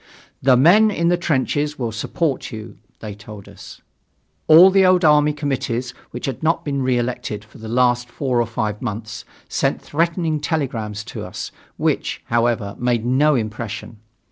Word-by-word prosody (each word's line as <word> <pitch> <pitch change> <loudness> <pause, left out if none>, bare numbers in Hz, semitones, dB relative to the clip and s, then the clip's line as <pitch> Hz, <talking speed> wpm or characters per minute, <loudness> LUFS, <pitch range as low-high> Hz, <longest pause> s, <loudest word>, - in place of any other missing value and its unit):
"The 130 -1 +5
men 190 - +6
in 170 -4 0
the 175 - +4
trenches 150 -2 -1
will 120 -3 -2
support 135 +6 -2
you," 110 0 -9 0.2
they 105 -2 -6
told 105 -1 -12
us. - - -13 0.6
All 170 +5 +9
the 195 0 +4
old 185 -1 +4
army 150 0 +5
committees 130 -4 -2 0.2
which 120 - -6
had 135 -3 -4
not 165 +1 0
been 140 -2 -1
reelected 120 -4 -2
for 105 - -17
the 110 - -8
last 125 +1 +1
four 125 -2 0
or 115 - -1
five 110 -2 -3
months, 110 -2 -5 0.2
sent - - 0
threatening 165 0 -1
telegrams 120 -9 -3
to - - -5
us, - - -6 0.3
which, - - -1
however, 115 -3 0
made 120 -2 0
no 140 +4 +3
impression. 110 -1 -5
125 Hz, 160 wpm, -20 LUFS, 115-150 Hz, 0.6 s, All